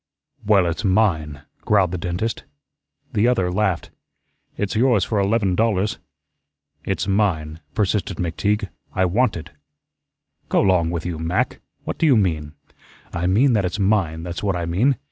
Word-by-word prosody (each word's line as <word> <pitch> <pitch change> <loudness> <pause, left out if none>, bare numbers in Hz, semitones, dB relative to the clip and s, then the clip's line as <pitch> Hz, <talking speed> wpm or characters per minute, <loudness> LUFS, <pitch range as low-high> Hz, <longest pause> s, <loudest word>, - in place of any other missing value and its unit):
"Well, 100 -3 +4
it's 85 +5 -2
mine," 85 -9 +1 0.2
growled 100 -5 +3
the 90 - -3
dentist. 90 +5 -3 0.7
The 105 +3 +3
other 95 -8 +1
laughed. 95 -3 -1 0.7
"It's 105 0 -2
yours 115 -4 +3
for 105 - 0
eleven 100 -1 +1
dollars." 105 0 +1 0.8
"It's - - -2
mine," 85 -6 0 0.2
persisted 100 -2 0
McTeague. 100 +4 -1 0.3
"I 95 -1 +3
want 105 +3 +1
it." 80 0 -9 1.0
"Go - - +3
'long 90 -4 +3
with 85 -2 -3
you, 85 -3 -3
Mac. 80 +2 -1 0.2
What - - -5
do 165 - +3
you 135 -5 +5
mean?" 80 -7 0 0.6
"I 85 +1 -1
mean 120 +8 +4
that 105 -3 +2
it's 90 +2 -2
mine, 95 -6 +1
that's 85 0 -5
what 100 -3 0
I 85 -1 -2
mean. 110 +11 +2
95 Hz, 155 wpm, -22 LUFS, 85-105 Hz, 1.0 s, you